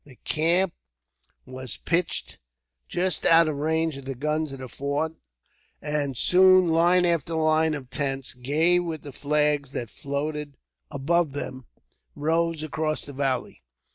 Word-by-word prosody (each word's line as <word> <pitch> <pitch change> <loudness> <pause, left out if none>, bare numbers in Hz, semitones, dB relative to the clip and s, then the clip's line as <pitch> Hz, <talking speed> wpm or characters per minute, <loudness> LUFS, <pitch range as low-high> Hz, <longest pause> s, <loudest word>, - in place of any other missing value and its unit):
The 135 -3 -16
camp 170 +4 +2 0.7
was 130 -1 -6
pitched 170 - -2 0.5
just 180 -1 0
out 165 0 +6
of 155 -2 -2
range 160 0 0
of 140 - -10
the 135 0 -4
guns 150 +3 -1
of 135 - -7
the 130 -1 -8
fort, 140 +5 -2 0.7
and 145 -3 -2
soon 185 +2 +5
line 175 +2 +4
after 165 -1 0
line 155 0 +2
of 130 -3 -9
tents, 135 -2 -2
gay 155 +8 +2
with 165 -3 -4
the 145 - -8
flags 145 -1 0
that 120 -2 -4
floated 145 0 -4 0.3
above 155 +2 0
them, 130 -3 -6 0.5
rose 160 +1 0
across 155 0 -2
the 145 - -8
valley. 135 -2 -2
150 Hz, 140 wpm, -25 LUFS, 140-165 Hz, 0.7 s, out